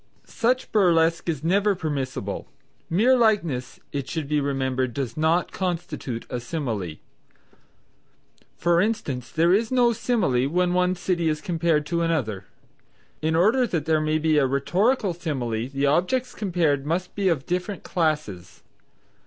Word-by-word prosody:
Such 250 +3 0
burlesque 170 -5 +3
is 155 -3 -2
never 200 +4 +2
permissible. 135 - -4 0.4
Mere 225 +10 +4
likeness, 170 - +1
it 140 -2 -4
should 160 -4 -3
be 150 0 +1
remembered, 130 -3 -1
does 135 -2 -3
not 160 +3 +1
constitute 160 -9 -4
a 125 - -4
simile. 115 - -4 1.6
For 170 0 +3
instance 150 - -2
there 170 +2 +3
is 220 +4 +1
no 245 -2 +4
simile 190 - +1
when 180 +2 +1
one 180 0 +2
city 175 -2 0
is 155 -1 -1
compared 165 -2 0
to 170 +2 -1
another. 125 - -1 0.8
In 160 +1 +1
order 225 +9 +3
that 165 -7 -2
there 160 -1 +2
may 155 0 +1
be 155 -1 +2
a 135 - +3
rhetorical 185 - +1
simile, 125 -9 -3
the 140 +1 -1
objects 180 - +1
compared 170 -8 0
must 170 +5 -2
be 200 -2 0
of 150 -6 -1
different 180 +2 -3
classes. 150 - -2
165 Hz, 145 wpm, -24 LUFS, 140-180 Hz, 1.6 s, Mere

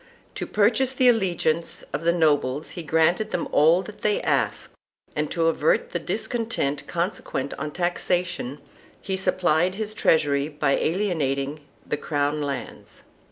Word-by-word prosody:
To - - -5
purchase 245 +5 +2
the 255 0 +4
allegiance 175 -7 +1
of 165 - -2
the 170 - +5
nobles 150 -4 +1
he 175 - -6
granted 165 +6 +2
them 175 - -2
all 165 +5 +5
that 210 -1 -11
they 210 -1 +2
asked, - - 0 0.4
and 150 0 -1
to 165 -2 0
avert 480 - +2
the - - -1
discontent 225 - -2
consequent 170 -6 -3
on 150 +1 -3
taxation 175 -4 -1 0.4
he 190 - -3
sup 190 0 0
plied 175 +1 +2
his 215 0 -2
treasury 145 -7 +2
by 145 -2 0
alienating 155 -6 -1 0.3
the 150 - -2
crown 145 0 -1
lands. 140 -3 -6
170 Hz, 145 wpm, -24 LUFS, 150-195 Hz, 0.4 s, the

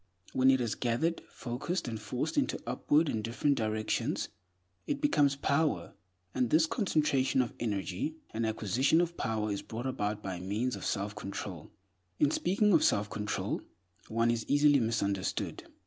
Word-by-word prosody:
When 130 0 +5
it 130 0 +5
is 120 -3 0
gathered, 130 +8 0
focused, 130 +8 -3
and 110 -2 -4
forced 125 +8 -2
into 285 -2 +1
upward 145 +6 +2
and 110 -5 -1
different 120 +5 +1
directions, 110 -2 -1 0.6
it 285 - -1
becomes 145 - +3
power; 145 +2 0 0.4
and 125 -2 +1
this 160 +4 +5
concentration 150 - +1
of 125 -3 +1
energy 100 - -2 0.2
and 115 +1 -2
acquisition 115 - +2
of 170 0 0
power 110 -5 -1
is 100 - -2
brought 115 +3 -6
about 105 -5 -2
by 95 -2 -4
means 105 +7 -1
of 100 - -7
self 105 +1 -1
control. 100 -2 -6 0.5
In 145 - +3
speaking 200 +5 +2
of 165 - +5
self 105 0 +2
control, 105 0 -2 0.5
one 115 +1 +2
is 115 -1 -1
easily 145 0 +5
misunderstood. 100 -5 -1
120 Hz, 155 wpm, -31 LUFS, 110-145 Hz, 0.6 s, When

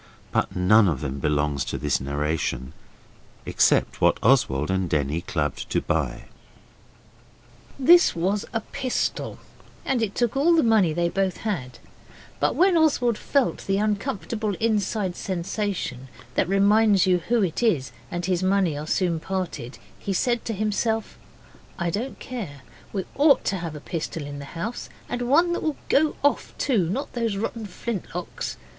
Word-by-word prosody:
But - - 0
none 100 +4 +5
of 80 -5 -1
them 70 -1 -4
belongs 75 -1 0
to - - -3
this 75 -2 0
narration, 70 -1 -2 0.7
except - - +2
what - - +4
Oswald 95 - +3
and 95 -2 0
Denny 75 +2 0
clubbed 75 -5 -3
to - - +1
buy. 75 -8 -2 1.5
This 340 +6 +6
was 195 +5 0
a 225 - -1
pistol, 255 +3 -2 0.5
and 260 -3 +1
it 210 -3 -1
took 240 -1 0
all 320 +5 +4
the 320 - +4
money 220 -7 +4
they 170 +2 +1
both 190 +1 -1
had, 130 - -3 0.6
but - - +1
when 370 0 +4
Oswald 265 -7 +3
felt 275 +4 0
the 195 0 +2
uncomfortable 210 0 -1
inside 210 -3 0
sensation 180 - -3 0.3
that 180 - +1
reminds 200 0 +4
you 180 -1 +3
who 235 -2 +3
it 175 +1 -1
is 155 - +1 0.2
and 175 0 -3
his 180 -1 0
money 190 -3 +2
that 145 - -4
are 150 - -6
soon 170 -1 +1
parted 180 -9 -4 0.2
he 195 - -3
said 240 +4 +1
to 225 - -2
himself 215 +2 -1 0.6
'I 170 -1 -1
don't 235 +8 -4
care. 190 - -6 0.3
We 195 -3 -3
ought 285 0 +4
to 195 - 0
have 165 -3 -5
a - - -6
pistol 160 -1 -4
in 145 0 -7
the 140 - -7
house, 215 +8 -4 0.2
and 245 - -3
one 320 +8 +3
that - - -2
will 310 -2 -1
go 305 +2 +3
off, 285 - +1
too 205 - +1
not 265 +10 -3
those 230 -4 -1
rotten 220 +1 -3
flintlocks. 180 -3 -5
195 Hz, 160 wpm, -24 LUFS, 145-230 Hz, 1.5 s, This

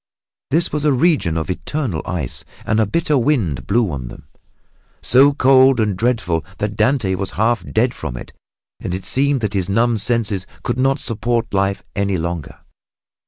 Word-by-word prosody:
This 165 +4 +1
was 150 -1 -1
a 150 - +3
region 130 - +2
of 80 +3 -2
eternal 115 - -3
ice 80 -8 -3 0.2
and 105 - +1
a 110 - +2
bitter 155 - +1
wind 110 - 0
blew 110 -2 +2
on 65 -5 -5
them, - - -11 0.7
so 135 +5 +5
cold 135 -2 +5
and 105 -3 +1
dreadful 90 -7 0
that 105 0 -3
Dante 110 -3 +1
was 95 +1 -2
half 115 +3 +1
dead 120 +3 +2
from 70 -6 -6
it - - -10 0.5
and 90 - -4
it 95 - -7
seemed 140 0 +1
that 105 -2 -2
his 95 -2 -1
numbed 115 +1 +2
senses 105 -5 0 0.2
could 120 +1 -2
not 135 +1 +2
support 115 0 -1
life 100 0 0
any 100 -1 0
longer. 85 -2 -5
110 Hz, 170 wpm, -19 LUFS, 95-130 Hz, 0.7 s, so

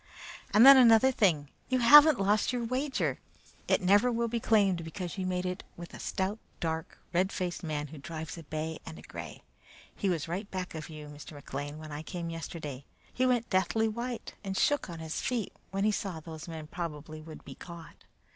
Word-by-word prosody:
"And, 215 +4 +7
then, 275 0 +11
another 240 +1 +7
thing. 170 - +2 0.2
You 255 - +2
haven't 295 +3 +8
lost 205 +4 +2
your 245 -1 -2
wager! 260 +4 -1 0.5
It - - +2
never 205 +7 +5
will 235 0 0
be 235 +1 -1
claimed, 200 -6 +3
because 170 +2 -5
you 185 - -1
made 180 0 -1
it 180 0 -3
with 170 0 -9
a - - -9
stout, 195 +3 -2 0.2
dark, 160 -1 -3 0.2
red 185 +3 +2
faced 180 -1 -3
man 150 -3 -3
who 155 0 -10
drives 160 +2 -6
a 165 - -8
bay 155 +1 -4
and 80 - -9
a 75 - -12
gray. - - -9 0.5
He 195 - -1
was 165 -4 -1
right 190 +5 -4
back 185 -1 -4
of 160 0 -7
you, 155 -1 -8
Mr. 150 +1 -10
McLean, 145 +1 -6
when 155 -1 -9
I 145 +1 -5
came 170 +1 -5
yesterday. 160 -4 -6 0.3
He 255 +1 +2
went 245 -2 +1
deathly 190 +4 +2
white 235 +2 -4
and 190 -1 -3
shook 290 -9 +2
on 170 - -6
his 160 -1 -4
feet 240 -5 -2 0.2
when 195 0 -2
he 215 - +4
saw 195 -5 -3
those 160 +1 -9
men 160 -2 -6
probably 155 -2 -6
would 155 0 -11
be 135 - -8
caught. 170 +3 -12
180 Hz, 205 wpm, -30 LUFS, 160-220 Hz, 0.5 s, then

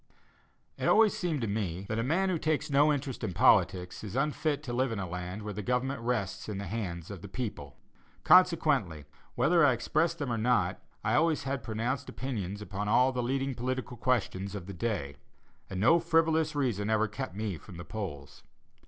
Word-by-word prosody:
It - - 0
always 220 -1 +5
seemed 165 -7 -1
to 115 - -1
me 100 -3 -2
that 110 +1 -2
a - - +1
man 180 +9 +1
who 175 -3 0
"takes 155 -1 -1
no 145 +2 +5
interest 135 -4 -3
in 100 -5 -2
politics" 90 0 +3
is 105 -1 -6
unfit 150 +1 0
to 120 -5 -5
live 130 0 +1
in 115 - -3
a 95 -2 -3
land 90 +4 -5
where 105 0 -4
the 105 - -4
government 125 +3 -1
rests 115 -5 -2
in 105 - -3
the 100 - -4
hands 90 -4 -4
of 95 - -8
the 100 - -8
people. 115 +2 -6 0.5
Consequently, 80 -4 +4 0.3
whether 160 +7 +4
I 140 -3 +6
expressed 155 +8 0
them 145 -5 -3
or 115 - -1
not, 110 -6 +1 0.2
I - - +1
always 160 0 +2
had 135 -1 -2
pronounced 120 +5 -3
opinions 105 -6 -4
upon 100 +1 -4
all 125 +5 +4
the 125 -1 -2
leading 135 +2 -1
political 125 0 -3
questions 105 -5 -1
of 95 -4 -6
the 100 - -7
day, 90 -9 -3 0.5
and 95 - -4
no 165 - +5
frivolous 160 -2 +2
reason 115 -7 0
ever 110 0 +2
kept 110 0 -6
me 105 -5 -3
from 90 - -12
the 85 - -8
polls. 75 -11 -7
115 Hz, 195 wpm, -30 LUFS, 100-140 Hz, 0.5 s, I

